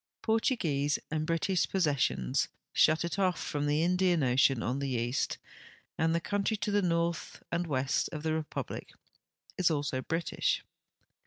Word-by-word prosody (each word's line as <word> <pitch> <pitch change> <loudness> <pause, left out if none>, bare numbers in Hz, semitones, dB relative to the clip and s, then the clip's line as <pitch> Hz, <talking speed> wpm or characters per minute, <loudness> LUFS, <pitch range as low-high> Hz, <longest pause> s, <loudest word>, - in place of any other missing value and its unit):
Portuguese 170 - +1
and 155 0 -1
British 170 +2 +1
possessions 145 -6 +1 0.3
shut 160 +2 +4
it 170 +4 -3
off 185 -2 +2
from 145 0 -2
the 150 +2 +2
Indian 180 -2 +2
ocean 130 0 +3
on 125 +3 -1
the 140 -1 -2
east, 120 +2 -1 0.6
and 165 +1 +1
the - - +2
country 205 +5 -1
to 210 - -2
the 205 0 +3
north 170 -2 -1
and 170 +1 -1
west 135 -2 0
of 155 -2 -6
the 160 -1 0
republic 160 -1 -4 0.7
is 180 - +4
also 145 -4 -1
British. 165 +5 -1
160 Hz, 150 wpm, -31 LUFS, 140-175 Hz, 0.7 s, shut